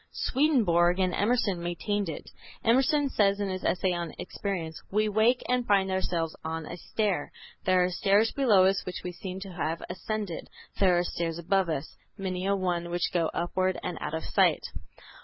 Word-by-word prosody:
Swedenborg 200 Hz, -, +2 dB
and 185 Hz, -1 st, +1 dB
Emerson 205 Hz, -4 st, +1 dB
maintained 185 Hz, +3 st, -2 dB
it. 155 Hz, -, -7 dB, 0.3 s
Emerson 270 Hz, +5 st, +3 dB
says 200 Hz, -5 st, +2 dB
in 200 Hz, -1 st, -1 dB
his 185 Hz, 0 st, -4 dB
essay 185 Hz, 0 st, +1 dB
on 170 Hz, -2 st, -4 dB
Experience, 170 Hz, -6 st, -4 dB
"We 215 Hz, +2 st, +2 dB
wake 220 Hz, +4 st, +3 dB
and 250 Hz, 0 st, +1 dB
find 195 Hz, -2 st, +3 dB
ourselves 170 Hz, -3 st, -1 dB
on 160 Hz, 0 st, -4 dB
a 170 Hz, -, -6 dB
stair. 190 Hz, -3 st, -1 dB, 0.3 s
There 185 Hz, -1 st, +4 dB
are 180 Hz, -, 0 dB
stairs 200 Hz, +4 st, +3 dB
below 215 Hz, -9 st, +4 dB
us 195 Hz, +1 st, +2 dB
which 180 Hz, -, -6 dB
we 180 Hz, -, -4 dB
seem 185 Hz, +1 st, -6 dB
to 195 Hz, -1 st, -7 dB
have 165 Hz, -1 st, -2 dB
ascended; 205 Hz, -1 st, -4 dB, 0.3 s
there 185 Hz, -3 st, +4 dB
are 175 Hz, -, +2 dB
stairs 170 Hz, -2 st, -3 dB
above 185 Hz, +1 st, +1 dB
us, 155 Hz, -2 st, -4 dB, 0.2 s
many 185 Hz, -1 st, -3 dB
a 200 Hz, -, +3 dB
one, 175 Hz, -3 st, -1 dB
which 175 Hz, +2 st, -1 dB
go 170 Hz, -2 st, +2 dB
upward 185 Hz, +2 st, 0 dB
and 175 Hz, -, -4 dB
out 160 Hz, -, -3 dB
of 160 Hz, -, -4 dB
sight." -, -, +3 dB
185 Hz, 180 wpm, -28 LUFS, 175-205 Hz, 0.3 s, There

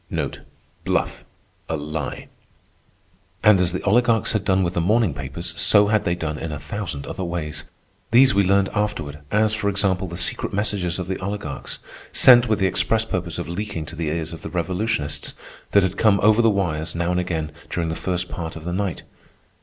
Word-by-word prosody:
A 80 Hz, -, -2 dB
lie. 75 Hz, 0 st, -5 dB, 1.2 s
And 105 Hz, -3 st, +6 dB
as 90 Hz, -2 st, +2 dB
the 90 Hz, -, -4 dB
oligarchs 115 Hz, +2 st, +3 dB
had 105 Hz, -3 st, -1 dB
done 95 Hz, -1 st, +2 dB
with 85 Hz, 0 st, -1 dB
the 85 Hz, -, 0 dB
morning 105 Hz, -1 st, +2 dB
papers, 70 Hz, +5 st, -4 dB
so 105 Hz, -1 st, +6 dB
had 110 Hz, -1 st, +2 dB
they 85 Hz, -, +1 dB
done 80 Hz, -3 st, -4 dB
in 80 Hz, -, -4 dB
a 75 Hz, -, -4 dB
thousand 85 Hz, -3 st, -5 dB
other 95 Hz, -, -5 dB
ways. 80 Hz, -4 st, -3 dB, 0.4 s
These 130 Hz, +3 st, +6 dB
we 100 Hz, -, +3 dB
learned 100 Hz, +1 st, +3 dB
afterward, 105 Hz, -9 st, -2 dB
as, 110 Hz, +1 st, +2 dB
for 105 Hz, -1 st, 0 dB
example, 95 Hz, -2 st, 0 dB
the 85 Hz, 0 st, -6 dB
secret 90 Hz, -, +1 dB
messages 100 Hz, -4 st, -1 dB
of 90 Hz, -, -4 dB
the 95 Hz, -, -3 dB
oligarchs, 95 Hz, -8 st, -5 dB, 0.3 s
sent 120 Hz, -2 st, +7 dB
with 110 Hz, -, +2 dB
the 95 Hz, -, +1 dB
express 110 Hz, +4 st, +2 dB
purpose 90 Hz, -5 st, -3 dB
of 85 Hz, -3 st, -4 dB
leaking 85 Hz, -2 st, -4 dB
to 80 Hz, -, -7 dB
the 80 Hz, -1 st, -3 dB
ears 80 Hz, +1 st, -2 dB
of 80 Hz, -, -9 dB
the -, -, -6 dB
revolutionists, 90 Hz, -4 st, -2 dB, 0.3 s
that 100 Hz, -, +4 dB
had 95 Hz, +1 st, -1 dB
come 105 Hz, -3 st, +4 dB
over 110 Hz, +2 st, +5 dB
the 115 Hz, -, +4 dB
wires, 85 Hz, -6 st, -1 dB
now 85 Hz, +1 st, 0 dB
and 90 Hz, -, +1 dB
again, 80 Hz, -4 st, -2 dB, 0.2 s
during 85 Hz, -2 st, -2 dB
the 80 Hz, -, -2 dB
first 90 Hz, +1 st, -2 dB
part 80 Hz, -3 st, -6 dB
of 80 Hz, -, -8 dB
the 90 Hz, +1 st, -4 dB
night. 95 Hz, -1 st, -2 dB
90 Hz, 195 wpm, -22 LUFS, 80-105 Hz, 1.2 s, sent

